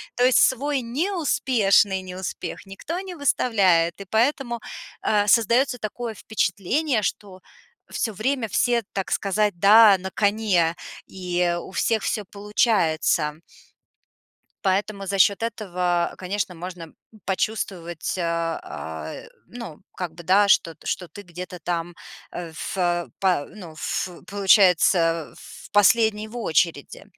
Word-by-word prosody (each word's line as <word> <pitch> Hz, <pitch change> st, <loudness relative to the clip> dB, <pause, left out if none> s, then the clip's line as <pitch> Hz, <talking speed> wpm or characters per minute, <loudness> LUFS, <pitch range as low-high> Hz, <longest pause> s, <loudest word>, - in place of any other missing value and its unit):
То 245 Hz, -, +3 dB
есть 255 Hz, -, +5 dB
свой 275 Hz, +1 st, +2 dB
неуспешный 240 Hz, -, +1 dB
неуспех 185 Hz, +1 st, -6 dB
никто 195 Hz, -, -6 dB
не 375 Hz, -2 st, -8 dB
выставляет, 195 Hz, -, +2 dB
и 200 Hz, -, -8 dB
поэтому, 240 Hz, +1 st, +1 dB, 0.4 s
э, 205 Hz, -1 st, +2 dB
создаётся 235 Hz, +4 st, +3 dB
такое 225 Hz, +2 st, -5 dB
впечатление, 220 Hz, -, -1 dB
что 190 Hz, -2 st, -4 dB, 0.5 s
всё 220 Hz, -, -2 dB
время 235 Hz, +4 st, -1 dB
все, 235 Hz, +3 st, +1 dB
так 195 Hz, -1 st, -3 dB
сказать, 205 Hz, -2 st, 0 dB
да, 205 Hz, +1 st, +7 dB
на 190 Hz, +1 st, -5 dB
коне, 200 Hz, -6 st, +1 dB, 0.3 s
и 180 Hz, -2 st, -1 dB
у -, -, -11 dB
всех 220 Hz, +2 st, 0 dB
всё 210 Hz, -, -1 dB
получается. 180 Hz, -7 st, +1 dB, 1.3 s
Поэтому 195 Hz, +1 st, -1 dB
за 200 Hz, -, -2 dB
счёт 200 Hz, +2 st, +4 dB
этого, 180 Hz, -5 st, -1 dB
конечно, 190 Hz, 0 st, -3 dB
можно 175 Hz, 0 st, -8 dB, 0.4 s
почувствовать, 185 Hz, -4 st, -3 dB
э, -, -, -1 dB
а, 80 Hz, -, -4 dB, 0.3 s
ну, 230 Hz, -11 st, -9 dB, 0.2 s
как 180 Hz, -2 st, -4 dB
бы, 170 Hz, -, -11 dB
да, 195 Hz, +4 st, +4 dB
что 165 Hz, -3 st, +3 dB
т 145 Hz, -, -18 dB
что 180 Hz, -, -2 dB
ты 205 Hz, -, -11 dB
где-то 180 Hz, 0 st, -8 dB
там, 170 Hz, +1 st, -3 dB, 0.4 s
э, 170 Hz, -2 st, -6 dB
фэ 175 Hz, +1 st, -2 dB
па 180 Hz, -7 st, +1 dB
ну, 180 Hz, -6 st, -11 dB
ф 155 Hz, +3 st, -3 dB, 0.2 s
получается 180 Hz, -, +3 dB
в -, -, -13 dB
последний 215 Hz, +1 st, +3 dB
в 230 Hz, -, -10 dB
очереди. 165 Hz, -8 st, -1 dB
195 Hz, 125 wpm, -23 LUFS, 175-220 Hz, 1.3 s, да